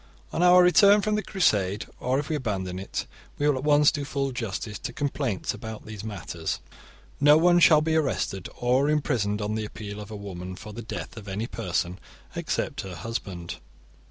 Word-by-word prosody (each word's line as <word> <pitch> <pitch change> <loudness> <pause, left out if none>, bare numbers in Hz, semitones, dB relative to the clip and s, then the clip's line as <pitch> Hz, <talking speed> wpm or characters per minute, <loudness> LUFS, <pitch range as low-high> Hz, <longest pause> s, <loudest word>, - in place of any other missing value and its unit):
On - - 0
our 180 0 +7
return 200 +3 +6
from 215 +1 0
the 210 - +1
Crusade, 105 - +1
or 130 +1 0
if 145 +1 -2
we 155 - -1
abandon 95 -9 -3
it, 95 - -4 0.3
we 145 - +1
will 145 - +4
at 130 - -4
once 150 0 +5
do 145 - -3
full 140 -1 -2
justice 110 -3 -4
to - - -5
complaints 135 -8 -2
about 110 +1 -8
these 105 -2 -8
matters. 100 -8 -4 0.3
* - - -22 0.3
No 145 +1 +7
one 175 +2 +5
shall 155 -3 +7
be 160 +1 +1
arrested 135 - -1
or 130 +4 +2
imprisoned 110 -9 0
on 105 +1 -1
the 110 0 -2
appeal 105 -1 -7
of 105 -1 -8
a 110 - -6
woman 95 -3 -7
for 105 +3 -10
the 115 - -6
death 115 - -6
of 105 -2 -9
any 100 +3 -2
person 90 -5 -2 0.4
except - - -2
her 95 -2 -7
husband. 90 -3 -5
115 Hz, 195 wpm, -26 LUFS, 100-150 Hz, 0.4 s, our